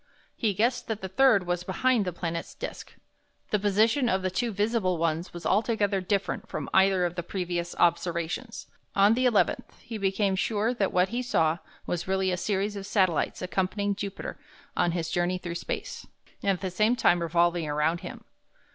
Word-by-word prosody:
He 215 -5 0
guessed 240 +4 +1
that 220 -2 -3
the 190 - -3
third 215 -2 +4
was 175 0 -1
behind 215 +4 +1
the 180 - -1
planet's 170 -1 -4
disk. - - -7 0.6
The 210 - +2
position 220 +6 +3
of 190 -2 +1
the 185 - 0
two 230 +6 -1
visible 205 -3 0
ones 165 +1 -1
was 175 -1 -9
altogether 205 -1 +1
different 190 -1 -2
from 150 - -5
either 190 -1 +4
of 175 - -2
the 175 - -3
previous 175 -1 -3
observations. 175 +6 0 0.3
On 200 +2 +6
the 255 +2 +3
11th 225 -5 +1
he 230 -2 -7
became 195 0 +1
sure 215 +4 0
that 200 -6 0
what 180 +1 +2
he 240 +2 -2
saw 165 -9 +1 0.3
was 175 +1 -3
really 190 0 +1
a - - +1
series 205 +2 -1
of 195 -1 -6
satellites 185 -4 +1
accompanying 195 +2 0
Jupiter 200 0 -6 0.4
on 175 - +2
his 170 -2 -2
journey 175 +1 +1
through 175 -2 -5
space, 470 - -5 0.3
and 200 - 0
at 190 -2 +1
the 190 -2 -3
same 215 +6 +2
time 175 -7 +3
revolving 170 0 +1
around 150 +3 +1
him. - - -9
190 Hz, 180 wpm, -27 LUFS, 175-210 Hz, 0.6 s, On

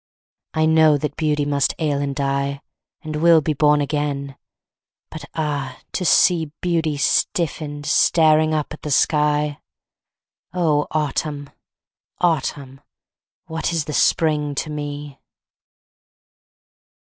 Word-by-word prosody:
I 155 0 +2
know 160 -1 +5
that 145 0 -4
Beauty 150 -2 0
must 145 -1 0
ail 150 -3 -1
and 140 -1 -3
die, 140 0 -2 0.4
And 155 -1 -4
will 165 +1 +5
be 155 0 -1
born 150 +1 +3
again, 140 -1 -3 0.8
but - - -8
ah, 145 -4 -3
to 185 - -3
see 165 -3 +3
Beauty 165 -4 -1
stiffened, 145 -1 -1
staring 155 -1 +3
up 155 -1 -2
at 155 - -11
the 150 - -5
sky! 150 +1 +1 1.0
Oh, 155 -5 +1
Autumn! 145 -1 -3 0.7
Autumn! 140 -5 -1 0.6
What 160 +1 -3
is 165 -3 -1
the 150 - -5
Spring 150 -1 +1
to 155 +2 -3
me? 145 -1 -6
150 Hz, 115 wpm, -21 LUFS, 145-155 Hz, 1.0 s, know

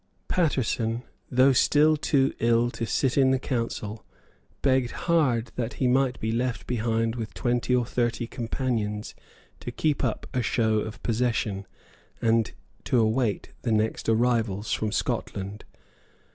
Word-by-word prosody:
Paterson, 125 -8 0 0.3
though 130 +2 +5
still 150 +4 +4
too 140 -2 +2
ill 115 +1 +3
to 115 - -4
sit 135 +3 +1
in 135 -1 +5
the 130 - +3
Council, 115 -4 -3 0.6
begged 130 -3 +3 0.2
hard 130 -9 +2
that 120 -1 -2
he 130 - 0
might 130 0 +2
be 110 - -1
left 120 -1 -1
behind 115 -1 0
with 115 -3 -5
twenty 120 +1 +1
or 125 -1 +2
thirty 120 0 -1
companions 115 -3 -3 0.5
to - - -6
keep 150 -2 0
up - - -1
a 125 - +1
show 110 -2 +1
of 110 +1 -6
possession, 115 -4 -1 0.5
and 115 -2 +2 0.3
to 125 - +2
await 110 -1 +1
the 120 - -1
next 110 +1 0
arrivals 115 -3 +1
from 110 -1 -1
Scotland. 100 0 -3
120 Hz, 140 wpm, -26 LUFS, 110-130 Hz, 0.6 s, though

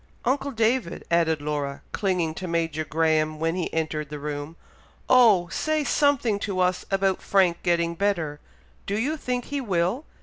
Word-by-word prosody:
Uncle 275 +3 +1
David!" 230 -5 0
added 160 -3 +2
Laura, 145 -2 -3
clinging 180 -6 0
to 185 +3 -6
Major 165 -2 -1
Graham, 155 0 +1
when 165 +1 0
he 180 -2 -2
entered 155 -2 -2
the 150 - -6
room, 145 +2 -5 0.5
"oh! 220 -9 +6
say 310 - 0
something 275 -8 +2
to 200 -3 -3
us 180 0 +1
about 195 -1 +1
Frank 185 -4 +2
getting 170 -1 +1
better, 170 -6 -1 0.5
do 200 - -1
you 275 +8 0
think 250 -5 -3
he 285 -1 -3
will? 195 - 0
175 Hz, 160 wpm, -25 LUFS, 160-220 Hz, 0.5 s, oh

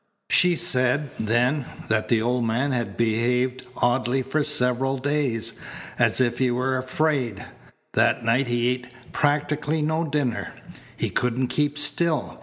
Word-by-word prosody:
She 180 -2 +5
said, 135 -3 +1
then, 120 +6 +1 0.2
that 110 0 0
the 115 -2 +2
old 125 +1 0
man 120 +5 0
had 120 -6 -3
behaved 125 +3 0
oddly 125 +1 +1
for 145 +4 0
several 135 -2 0
days, 130 -5 -1 0.5
as - - +3
if 120 -2 +1
he 130 -1 +2
were 130 +2 0
afraid. 130 -5 -1 0.5
That - - +2
night 120 +4 +2
he 120 0 +1
ate 125 -1 -3 0.2
practically 150 +1 0
no 160 +2 0
dinner. 145 -6 -2 0.4
He - - -2
couldn't 125 +1 0
keep 145 +1 0
still. 155 +2 0
130 Hz, 140 wpm, -24 LUFS, 120-145 Hz, 0.5 s, She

